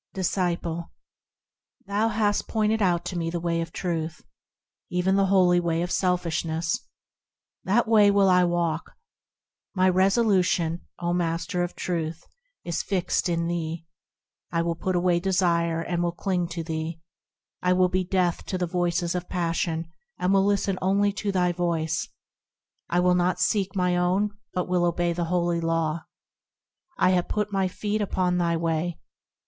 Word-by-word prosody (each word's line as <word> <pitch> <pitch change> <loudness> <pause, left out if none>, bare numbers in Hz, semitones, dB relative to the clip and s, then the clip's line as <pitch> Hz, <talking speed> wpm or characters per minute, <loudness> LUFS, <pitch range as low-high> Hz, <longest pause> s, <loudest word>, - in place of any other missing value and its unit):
Disciple. 175 -3 -1 1.0
Thou 205 +3 +1
hast 210 -2 0
pointed 220 0 +1
out 175 -3 +2
to 180 - -4
me 165 -1 -1
the 170 +1 -2
way 170 0 -1
of 165 0 -5
Truth, 165 -2 -3 0.7
Even 180 +1 +1
the 195 0 +3
holy 180 -2 +4
way 170 -1 0
of 175 - -4
selfishness. 170 -2 -1 0.8
That 220 +5 +2
way 215 -2 +6
will 200 -1 +4
I 180 -1 +5
walk; 170 -2 -1 0.8
My 185 0 +3
resolution, 185 -3 +2 0.2
O 175 0 -1
Master 175 +1 -1
of 175 0 -3
Truth! 165 -2 -3 0.4
is 170 - -2
fixed 185 -2 0
in 170 -1 0
thee. 165 -1 -3 0.7
I 165 -1 +1
will 170 0 0
put 185 +3 -2
away 175 0 +2
desire, 170 -3 +1
and 170 +1 -2
will 175 0 +1
cling 180 -1 -1
to 170 -1 -5
thee; 160 0 -4 0.6
I 180 0 +3
will 185 0 +4
be 185 +1 0
deaf 180 -2 0
to 185 - -2
the 180 - 0
voices 175 0 0
of 180 -1 -4
passion, 165 -1 -1 0.3
and 185 +2 +1
will 195 0 +4
listen 200 -2 +1
only 200 +2 +2
to 200 0 -2
thy 180 -2 +2
voice; 165 -2 -1 0.8
I 175 - +2
will 180 0 +4
not 180 0 +1
seek 200 -2 +1
my 180 -1 +2
own, 190 +4 +1 0.2
but 180 - -2
will 180 -1 +1
obey 175 0 +1
the 170 0 -2
holy 175 0 0
Law. 165 -1 +1
Lo! 170 - -5 1.0
I 185 - +4
have 180 -1 +1
put 210 -1 -2
my 195 -1 +2
feet 210 +3 -2
upon 180 -3 0
thy 170 -1 +1
way. 165 +1 -1
175 Hz, 160 wpm, -25 LUFS, 170-190 Hz, 1.0 s, way